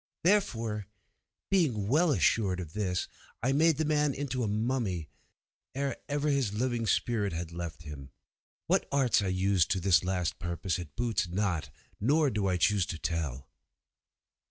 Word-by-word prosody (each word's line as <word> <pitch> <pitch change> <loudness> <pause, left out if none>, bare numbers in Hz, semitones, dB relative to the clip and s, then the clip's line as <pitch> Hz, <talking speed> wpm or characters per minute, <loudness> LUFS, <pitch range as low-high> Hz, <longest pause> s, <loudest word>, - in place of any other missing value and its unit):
Therefore, 115 - +1 0.6
being 135 - +2
well 160 +9 +3
assured 100 -8 +2
of 85 -3 -7
this, 95 -4 -1 0.4
I 130 - +2
made 155 +2 +4
the 160 - 0
man 150 -2 +2
into 130 -3 -2
a 115 - 0
mummy, 105 - -1 0.7
ere 140 0 -1
ever 145 +1 0
his 135 -8 +1
living 120 0 -1
spirit 105 -3 +1
had 85 0 -4
left 85 -1 -6
him. 70 -3 -9 0.6
What - - +2
arts 135 -6 +3
I 100 - -1
used 95 -1 +2
to 95 - +1
this 90 -1 +4
last 90 -2 -1
purpose 85 0 -2
it 80 -5 -8
boots 110 -5 0
not, 90 -2 -1 0.3
nor 145 +6 +3
do 105 -2 0
I 90 -1 +1
choose 95 +1 +2
to 85 - -4
tell. 80 -6 -3
105 Hz, 155 wpm, -30 LUFS, 90-130 Hz, 0.7 s, made